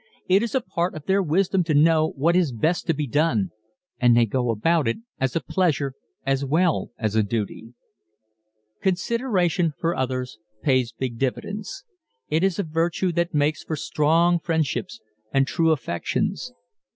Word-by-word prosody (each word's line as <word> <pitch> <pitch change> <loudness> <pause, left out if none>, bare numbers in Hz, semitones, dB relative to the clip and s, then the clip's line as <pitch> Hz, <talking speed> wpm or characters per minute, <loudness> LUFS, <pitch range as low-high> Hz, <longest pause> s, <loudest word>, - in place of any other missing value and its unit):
It 190 +2 +4
is 235 +1 -2
a 260 - +2
part 175 -5 -2
of 155 -1 -8
their 195 +3 +2
wisdom 185 +2 +1
to 155 -2 +1
know 155 +1 +5
what 165 +5 +2
is 175 -6 +3
best 160 +11 0
to 165 - +3
be 150 0 -1
done 135 - +1 0.5
and 120 -1 +5
they 120 - +5
go 125 +2 -1
about 150 +7 +2
it 115 - 0 0.2
as 130 -1 -1
a - - +3
pleasure 150 -7 0 0.3
as 135 0 +1
well 160 +5 +1
as 110 -2 -2
a 110 - +4
duty. 110 +2 -4 1.1
Consideration 185 - +1
for 170 +1 0
others 130 -3 -3 0.2
pays 130 -4 +2
big 115 0 -5
dividends. 205 - -3 0.5
It 160 +3 +1
is 195 -2 +1
a 200 - 0
virtue 165 +3 0
that 170 0 -1
makes 145 +1 +1
for 160 - -3
strong 165 +4 +2
friendships 165 - -2 0.3
and 135 0 +3
true 165 +3 +1
affections. 130 - -1
155 Hz, 165 wpm, -24 LUFS, 130-175 Hz, 1.1 s, know